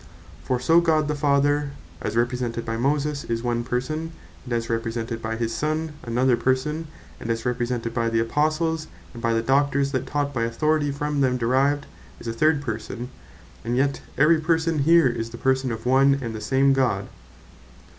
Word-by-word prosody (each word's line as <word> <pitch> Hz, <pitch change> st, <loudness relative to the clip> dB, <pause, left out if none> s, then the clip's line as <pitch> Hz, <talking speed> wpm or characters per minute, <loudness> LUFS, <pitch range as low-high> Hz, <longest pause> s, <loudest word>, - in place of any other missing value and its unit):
For 125 Hz, -1 st, 0 dB
so 165 Hz, +7 st, +4 dB
God 155 Hz, -3 st, +2 dB
the 150 Hz, -, 0 dB
Father, 145 Hz, 0 st, +1 dB, 0.3 s
as 105 Hz, +2 st, -2 dB
Represented 120 Hz, -1 st, -1 dB
by 115 Hz, -, -2 dB
Moses, 145 Hz, +4 st, 0 dB
is 115 Hz, 0 st, -2 dB
one 120 Hz, -1 st, 0 dB
Person; 155 Hz, +7 st, -3 dB, 0.3 s
and 125 Hz, -, -9 dB
as 115 Hz, -1 st, -1 dB
Represented 115 Hz, 0 st, -3 dB
by 110 Hz, 0 st, -3 dB
his 115 Hz, 0 st, -2 dB
Sonne, 155 Hz, +5 st, -1 dB
another 125 Hz, +1 st, +2 dB
Person, 130 Hz, +6 st, -1 dB, 0.3 s
and 115 Hz, -, -6 dB
as 115 Hz, 0 st, -1 dB
Represented 120 Hz, -1 st, -1 dB
by 115 Hz, -1 st, 0 dB
the 115 Hz, 0 st, +1 dB
Apostles, 155 Hz, +6 st, 0 dB, 0.3 s
and 120 Hz, -, -9 dB
by 115 Hz, 0 st, +1 dB
the 115 Hz, -, +1 dB
Doctors 140 Hz, +2 st, +2 dB
that 130 Hz, -, -2 dB
taught 145 Hz, -1 st, -1 dB
by 120 Hz, -, -1 dB
authority 145 Hz, +6 st, +1 dB
from 145 Hz, +1 st, -1 dB
them 130 Hz, -2 st, +2 dB
derived, 135 Hz, +4 st, +1 dB, 0.3 s
is -, -, -12 dB
a 115 Hz, -, -2 dB
third 150 Hz, +3 st, +2 dB
Person; 115 Hz, 0 st, -5 dB, 0.5 s
and 120 Hz, +2 st, -1 dB
yet 140 Hz, +1 st, +1 dB, 0.2 s
every 155 Hz, +2 st, +5 dB
Person 160 Hz, 0 st, +1 dB
here, 165 Hz, +2 st, +5 dB
is 115 Hz, -2 st, -2 dB
the 120 Hz, -, -9 dB
Person 130 Hz, 0 st, +1 dB
of 110 Hz, +1 st, -6 dB
one 135 Hz, +2 st, +4 dB
and 115 Hz, -4 st, -4 dB
the 110 Hz, -, -6 dB
same 135 Hz, +2 st, +3 dB
God. 120 Hz, -8 st, +1 dB
130 Hz, 185 wpm, -24 LUFS, 115-145 Hz, 0.5 s, every